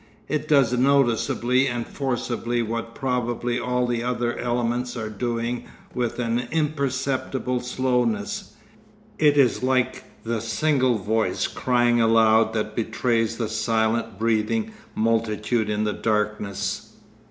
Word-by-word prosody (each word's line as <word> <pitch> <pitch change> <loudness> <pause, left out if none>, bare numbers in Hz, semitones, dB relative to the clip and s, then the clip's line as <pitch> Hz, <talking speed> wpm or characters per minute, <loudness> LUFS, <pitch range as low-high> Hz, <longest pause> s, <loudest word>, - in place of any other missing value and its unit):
It 150 0 -2
does 140 -5 +4
noticeably 125 -1 +2
and 120 -2 -2
forcibly 120 -3 -2
what 115 +1 -4
probably 125 -2 -1
all 125 0 0
the 120 -1 -1
other 120 -1 -1
elements 120 +1 -1
are 110 -2 -4
doing 120 +2 -2 0.3
with 120 -2 -2
an 120 0 -1
imperceptible 135 -4 -1
slowness. 125 -4 -1 0.6
It 150 -1 +4
is 135 -4 +4
like 130 0 +1 0.2
the 115 -1 -2
single 130 +1 +1
voice 110 +2 0
crying 120 -1 +2
aloud 110 0 +4
that 110 -1 -2
betrays 115 0 0
the 115 - -1
silent 110 -1 0
breathing 115 - 0 0.2
multitude 110 0 0
in 105 0 0
the 105 -1 0
darkness. 105 -2 -2
120 Hz, 120 wpm, -24 LUFS, 115-125 Hz, 0.6 s, does